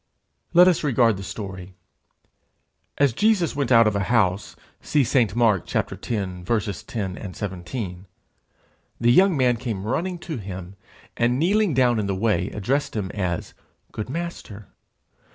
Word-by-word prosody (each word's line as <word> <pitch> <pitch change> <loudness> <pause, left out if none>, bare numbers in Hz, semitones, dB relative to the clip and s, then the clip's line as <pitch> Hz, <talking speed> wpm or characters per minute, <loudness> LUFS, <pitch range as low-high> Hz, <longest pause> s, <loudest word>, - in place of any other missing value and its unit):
Let 180 +1 +8
us 180 -4 +2
regard 120 -7 +3
the - - -7
story. 95 -2 -7 1.2
As 140 -4 +3
Jesus 205 - +2
went 140 -3 -1
out 115 -1 +7
of 105 -1 +1
a 100 -1 0
house 100 -5 +1 0.3
(see 145 -2 +2
St. 115 -5 +1
Mark 110 -6 +1
x. - - 0
10 100 -6 -3 0.6
and 95 -3 -4
17), 95 0 -6 0.9
the 120 +1 +4
young 185 +4 +5
man 125 -2 +3
came 115 -5 -4
running 175 +10 -2
to 165 -3 -6
him, 95 -3 -8 0.4
and 120 +1 +1
kneeling 190 +1 +2
down 120 -3 +3
in 105 - -1
the 100 - -1
way, 100 -2 0
addressed 130 +8 -2
him 100 -4 -3
as 90 -4 -3 0.4
'Good 110 - -5
Master.' 140 - -6
115 Hz, 145 wpm, -23 LUFS, 95-135 Hz, 1.2 s, Let